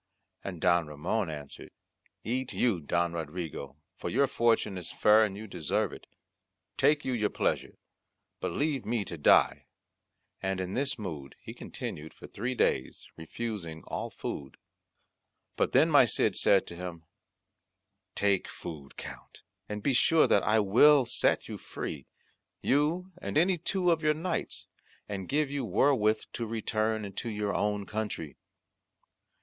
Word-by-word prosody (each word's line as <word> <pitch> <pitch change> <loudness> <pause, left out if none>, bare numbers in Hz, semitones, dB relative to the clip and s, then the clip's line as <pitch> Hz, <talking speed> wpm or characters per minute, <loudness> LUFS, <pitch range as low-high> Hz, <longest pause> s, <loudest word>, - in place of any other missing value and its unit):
And 90 -4 -5
Don 85 -2 +3
Ramond 85 +7 -2
answered, 75 -2 -8 0.5
"Eat 130 +3 -2
you, 115 -8 +2
Don 85 +3 0
Rodrigo, 80 -4 -5 0.2
for - - -4
your 140 +4 +3
fortune 115 -5 +1
is 90 -3 -6
fair 110 +1 +5
and 100 -2 -2
you 110 - -7
deserve 85 -7 -1
it; - - -11 0.7
take 145 +2 +3
you 130 - 0
your 105 -3 +1
pleasure, - - -1 0.6
but - - -2
leave 145 -3 0
me 115 -3 -1
to 85 - -5
die." 75 - +4 0.7
And 95 0 -1
in 95 0 -3
this 140 +2 0
mood 80 - -6
he - - -9
continued 75 +1 -7
for - - -12
three 125 +5 -4
days, 65 - 0
refusing 85 -2 -5
all - - -4
food. 70 -2 -6 1.0
But - - +1
then - - +5
my - - +7
Cid - - +1
said 100 -1 +4
to 85 - -8
him, 85 -2 -7 1.1
"Take 100 -2 +2
food, 75 -5 -9
Count, - - -10 0.3
and 105 -1 -4
be 140 - +2
sure 160 +5 +5
that 100 - +4
I 110 +2 +3
will 130 +7 +6
set - - +1
you - - -6
free, 70 -4 -6 0.6
you 160 +7 +1
and - - -2
any 175 +2 +3
two 180 +1 +1
of 165 -1 +1
your 150 -1 +3
knights, 170 +3 -3 0.4
and 95 -3 -5
give 145 -1 +1
you 140 -2 -2
wherewith 110 0 +2
to 115 - -3
return 110 -1 -1
into 100 +4 -5
your 105 -1 -2
own 105 -1 0
country." 105 -9 -4
105 Hz, 150 wpm, -30 LUFS, 85-130 Hz, 1.1 s, my